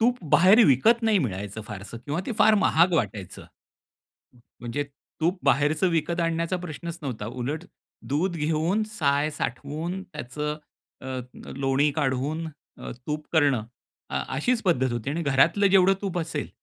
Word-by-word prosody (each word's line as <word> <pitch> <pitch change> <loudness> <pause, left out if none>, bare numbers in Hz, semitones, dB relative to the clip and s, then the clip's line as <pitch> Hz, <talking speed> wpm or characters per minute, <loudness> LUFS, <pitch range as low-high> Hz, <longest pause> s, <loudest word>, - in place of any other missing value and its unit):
तूप 245 +2 +2
बाहेर 200 +6 +7
विकत 225 - +4
नाही 220 -3 +3
मिळायचं 105 - -3
फारसं 105 +3 -8
किंवा 145 +8 -3
ते 245 - -2
फार 215 +1 +6
महाग 180 -3 +4
वाटायचं, 100 - -2 0.9
म 125 - -21 0.2
म्हणजे 120 +5 -3 0.4
तूप 175 +4 +1
बाहेरचं 145 +6 +3
विकत 170 +1 0
आणण्याचा 165 +2 0
प्रश्नच 170 0 -6
नव्हता. 120 -7 -4
उलट 130 +8 -4 0.4
दूध 170 +6 0
घेऊन 160 +7 0
साय 145 -6 +1
साठवून 155 +8 -4
त्याचं 150 -2 -5 0.5
अ, - - -8
अ, 130 -1 -3 0.4
लोणी 140 +2 +2
काढून 145 +3 -1 0.3
अ, - - -7 0.2
तूप 150 0 -3
करणं 140 -8 +3 0.5
अ, 70 - -1 0.2
अशीच 235 - +1
पद्धत 130 - +1
होती 120 +3 -3
आणि 165 +4 -2
घरातलं 165 +8 +3
जेवढं 195 0 +5
तूप 190 -3 -2
असेल, 160 -3 -3
150 Hz, 150 wpm, -25 LUFS, 135-180 Hz, 0.9 s, बाहेर